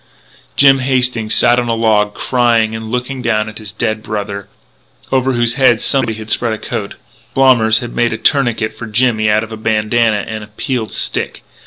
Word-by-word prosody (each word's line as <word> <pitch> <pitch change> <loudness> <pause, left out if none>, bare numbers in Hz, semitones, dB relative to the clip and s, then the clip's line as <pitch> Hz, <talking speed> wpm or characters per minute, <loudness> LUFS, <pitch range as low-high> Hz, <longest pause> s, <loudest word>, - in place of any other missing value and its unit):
Jimmy 135 -1 +5
Hastings 125 -4 +1
sat 120 +1 +4
on 120 - -2
a 115 - +1
log, 105 -2 +1
crying 115 -3 +1
and 110 0 -6
looking 125 +2 -3
down 110 -3 0
at 110 +1 -8
his 105 -2 -8
dead 110 +1 -2
brother, 100 -2 -5 0.6
over 130 0 +1
whose 120 -1 +1
head 125 -3 +3
somebody 130 -5 +1
had 110 0 -7
spread 115 -2 0
a - - -3
coat. 100 -1 -5 0.4
Blommers 120 -5 +4
had 120 -1 -7
made 120 0 +1
a 110 - -3
tourniquet 120 -6 0
for 115 - -8
Jimmy 110 -1 +1
out 105 +1 +2
of 110 - -9
a 110 - -6
bandanna 110 0 +1
and 110 -1 -5
a - - -11
peeled 110 +2 -4
stick. - - -3
115 Hz, 190 wpm, -15 LUFS, 110-125 Hz, 0.6 s, Jimmy